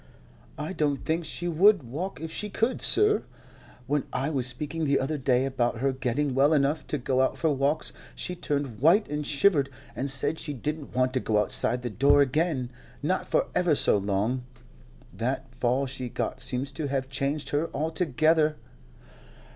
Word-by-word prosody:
"I 155 +5 -4
don't 145 -5 -1
think 165 +1 -1
she 175 +3 -4
would 180 +1 +4
walk 155 +11 -5
if 160 0 -6
she 210 - -3
could, 225 +5 0
sir. 420 +1 +4 0.6
When 145 0 0
I 140 +4 -1
was 130 -4 -1
speaking 150 +5 -3
the 140 -1 +2
other 145 +3 -2
day 130 0 +2
about 125 -3 -1
her 135 +3 +1
getting 130 +2 -1
well 140 +4 +4
enough 145 +1 +1
to 150 - -1
go 130 0 0
out 130 - +1
for 160 -2 +1
walks, 140 +3 0 0.2
she 180 - -3
turned 140 -8 -3
white 170 - +4
and 150 0 -3
shivered, 145 -1 +3 0.3
and 140 - -2
said 135 +4 +2
she 150 - -4
didn't 150 +3 -5
want 130 0 +2
to 130 - +1
go 110 -3 0
outside 115 +3 +1
the 120 - -3
door 140 +5 +5
again, 140 -2 -1 0.3
not 185 +5 0
for - - +2
ever 175 -4 +2
so - - +4
long. 105 +5 0 0.7
That 125 +5 -3
fall 125 +2 0
she 130 -1 -5
got 130 - -3
seems 130 +2 -1
to 145 +2 -4
have 135 -1 -2
changed 140 +2 -2
her 150 +3 0
altogether." 155 0 +1
140 Hz, 180 wpm, -27 LUFS, 130-155 Hz, 0.7 s, door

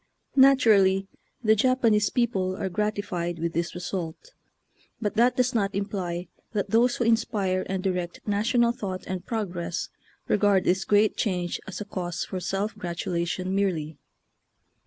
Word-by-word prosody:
Natu 265 -3 +6
rally 195 -1 +4 0.4
the 220 -1 +5
Japanese 225 -3 +3
people 195 -7 0
are 190 - -2
gratified 190 -4 -2
with 170 0 -2
this 170 +1 -2
result, 180 - -5 0.7
but 210 -3 -1
that 240 +3 +3
does 250 0 +2
not 200 -4 0
imply 185 -3 -3 0.3
that 205 -2 -2
those 240 +2 +4
who - - -1
inspire 205 -5 +1
and 190 -1 -2
direct 180 -3 -2
national 235 +3 +2
thought 200 -6 -5
and 185 0 -5
progress 180 -6 -3 0.4
regard 205 -2 +3
this 190 +1 +1
great 210 +1 +3
change 180 -5 -1
as 190 - -6
a - - -4
cause 175 -3 -4
for 185 - -4
self 195 +4 -2
gratulation 175 -1 -2
merely. 170 -6 -1
195 Hz, 145 wpm, -26 LUFS, 180-220 Hz, 0.7 s, Natu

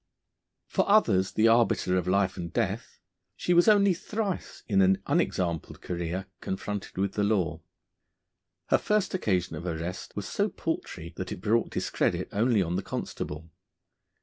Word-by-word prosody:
For - - 0
others 100 - +4
the 110 +1 +4
arbiter 115 -5 +3
of 90 -1 0
life 95 0 +2
and 85 -1 -5
death, - - -2 0.4
she 180 - 0
was 175 +3 +5
only 200 -3 +6
thrice 200 +2 -4
in 100 -3 +3
an 95 0 +4
unexampled 85 -3 -1
career 85 +2 -3 0.2
confronted 100 +1 -4
with 95 0 0
the 105 - 0
law. 90 -7 +1 1.1
Her - - +4
first 210 -2 +1
occasion 95 - 0
of 85 - -6
arrest 85 +2 -4
was - - -4
so - - 0
paltry 85 +2 -4
that 95 - -4
it - - -5
brought 110 +5 +1
discredit - - -1
only 110 -1 +3
on 85 +1 -2
the - - -1
constable. 80 -3 -5
95 Hz, 150 wpm, -28 LUFS, 90-115 Hz, 1.1 s, only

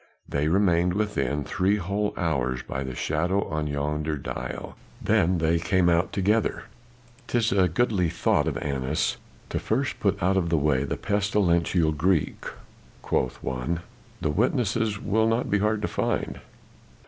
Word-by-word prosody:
They 75 +1 0
remained 90 -1 +3
within, 75 -10 -1
three 95 +7 +1
whole 100 +2 -1
hours 65 -8 -1
by 65 - -4
the 65 -2 -5
shadow 85 +9 0
on 75 -1 -2
yonder 75 +1 -2
dial, 70 - -6 0.2
then 90 +2 +2
they 80 0 +2
came 90 +1 +2
out 85 +1 +2
together. 105 +3 +1 0.6
"''Tis 115 -2 +1
a 95 -2 +4
goodly 95 -2 +1
thought - - +1
of - - -1
Annas 70 +1 -1 0.3
to - - -1
first 120 +2 -1
put 100 -3 +1
out 95 +2 +3
of 85 -3 +1
the 80 - +2
way 70 -2 +2
the - - -3
pestilential 90 -5 +1
Greek,' 80 +2 0 0.6
quoth 65 - -1
one, 65 +7 -2 0.4
'the 75 - 0
witnesses 110 - +1
will 110 +2 +1
not 115 +2 0
be 100 - +3
hard 105 +1 0
to - - +1
find. - - -2
85 Hz, 150 wpm, -26 LUFS, 75-105 Hz, 0.6 s, a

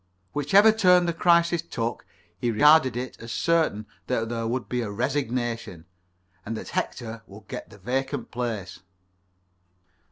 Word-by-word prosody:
Whichever 195 +10 +5
turn 180 -5 +4
the 170 - 0
crisis 170 0 +3
took, 120 -8 -4 0.3
he 120 - 0
regarded 145 +1 +5
it 125 +1 -5
as 115 0 -8
certain 160 -12 +1 0.2
that 115 -3 -1
there 115 -1 -2
would 120 +2 -2
be 125 -1 -1
a 110 - -3
resignation, 120 - -2 0.6
and 110 +1 -4
that - - -7
Hector 115 -1 -4
would 100 0 -14
get - - -7
the 105 - -14
vacant 130 +5 -3
place. 110 -7 -4
125 Hz, 140 wpm, -25 LUFS, 115-155 Hz, 0.6 s, Whichever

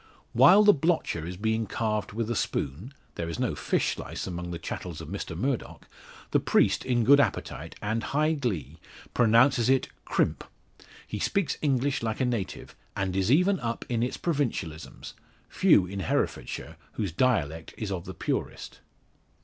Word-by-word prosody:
While 180 - +7
the 205 0 +8
blotcher 155 - 0
is 90 0 -6
being 110 +2 0
carved 105 -2 -2
with 115 +2 -2
a - - -1
spoon 85 - -2 0.2
there 85 -1 -4
is 85 - -4
no - - 0
fish - - 0
slice - - -6
among 90 -1 -5
the 85 - -4
chattels 85 0 -6
of 80 - -8
Mr 80 - -5
Murdock 130 +5 -3 0.4
the - - +4
priest - - +2
in 120 -2 +1
good 140 +5 +7
appetite, 140 - -1
and 110 +2 0
high 155 +2 +1
glee, 120 - -3 0.3
pronounces 120 +1 +4
it 135 -1 +3
"crimp." - - 0 0.6
He 105 - -5
speaks 195 - 0
English 140 -1 +1
like 110 -1 -2
a 130 - +2
native, 115 -6 -3 0.2
and 95 -2 -2
is 95 +4 +1
even 180 +6 +4
up 115 -1 -3
in 120 -2 0
its 125 - -1
provincialisms; 120 - -3 0.3
few 90 - +4
in 100 +2 -6
Herefordshire - - -2 0.2
whose 100 -5 -2
dialect 80 - 0
is 105 -3 -4
of 90 -3 -4
the 95 - -7
purest. - - -4
115 Hz, 165 wpm, -27 LUFS, 90-135 Hz, 0.6 s, the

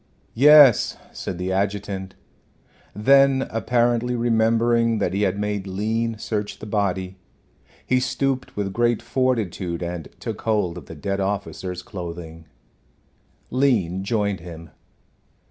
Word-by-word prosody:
"Yes," 145 -1 +6
said 90 - -6
the 90 +1 -3
adjutant. 100 -1 -2 0.8
Then 135 +4 +4
apparently 120 +2 +1
remembering 115 0 +2
that 90 - -1
he 100 - 0
had 100 -1 +1
made 105 -1 -2
Lean 110 +4 -1
search 105 -1 -3
the - - -9
body, 95 -3 -2 0.7
he 130 - +2
stooped 135 +1 -2
with 100 -2 -2
great 120 0 +2
fortitude 105 -9 -1
and 85 -2 -5
took - - -5
hold 105 -6 0
of - - -16
the 80 - -9
dead 100 +5 -3
officer's 95 -2 -3
clothing. 85 -4 -8 1.1
Lean 110 -9 +1
joined 100 -3 -1
him. 85 -1 -10
105 Hz, 120 wpm, -23 LUFS, 95-120 Hz, 1.1 s, Yes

